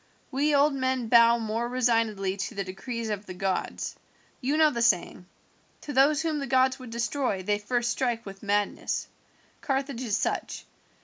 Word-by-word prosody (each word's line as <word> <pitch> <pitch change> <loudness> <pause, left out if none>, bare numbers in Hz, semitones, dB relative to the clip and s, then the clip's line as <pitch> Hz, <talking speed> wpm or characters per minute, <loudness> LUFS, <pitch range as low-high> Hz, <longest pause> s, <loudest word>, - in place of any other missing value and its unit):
We 290 +3 +2
old 285 +1 +4
men 260 -3 -1
bow 235 0 +6
more 225 +1 -2
resignedly 225 -6 +1
to 200 +3 -5
the 200 - -2
decrees 220 +5 -5
of 205 0 -4
the 185 - -7
gods. 190 0 -2 0.5
You 280 +4 0
know 310 -1 +5
the 235 -3 -2
saying, 185 -5 +1 0.6
'Those 290 +2 +3
whom 315 -2 -1
the 275 - -4
gods 260 0 +3
would 255 -2 -9
destroy 235 -3 -1
they 205 +2 0
first 240 +3 0
strike 235 -2 -1
with 195 -1 -9
madness.' 205 0 -1 0.5
Carthage 270 -2 -2
is 220 -5 0
such. - - -3
235 Hz, 165 wpm, -27 LUFS, 205-265 Hz, 0.6 s, bow